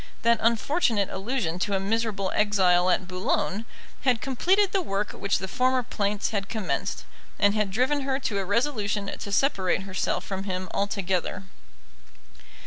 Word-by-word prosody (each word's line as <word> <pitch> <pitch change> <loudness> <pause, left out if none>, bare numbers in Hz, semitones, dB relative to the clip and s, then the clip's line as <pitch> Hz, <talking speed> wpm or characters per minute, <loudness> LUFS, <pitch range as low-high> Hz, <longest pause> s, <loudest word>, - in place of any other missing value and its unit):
That 230 0 +4
unfortunate 230 - +2
allusion 195 -4 -2
to 200 +2 0
a - - +1
miserable 200 -1 -1
exile 185 -4 +3
at 185 0 +1
Boulogne 185 +3 -1 0.4
had 255 -4 +2
completed 370 - +2
the 390 - +1
work 205 - -2
which 200 - 0
the 190 - -4
former 255 +5 +1
plaints 205 -2 -1
had 200 -2 -2
commenced, 220 -4 -2 0.3
and 205 0 +4
had 210 -2 +1
driven 255 +8 +1
her 265 -1 0
to 205 -6 -1
a - - -1
resolution 205 -2 0
to 200 - -7
separate 195 -6 +1
herself 190 -1 -1
from 190 0 -4
him 185 -1 -3
altogether. 195 -2 -1
205 Hz, 150 wpm, -26 LUFS, 190-235 Hz, 0.4 s, That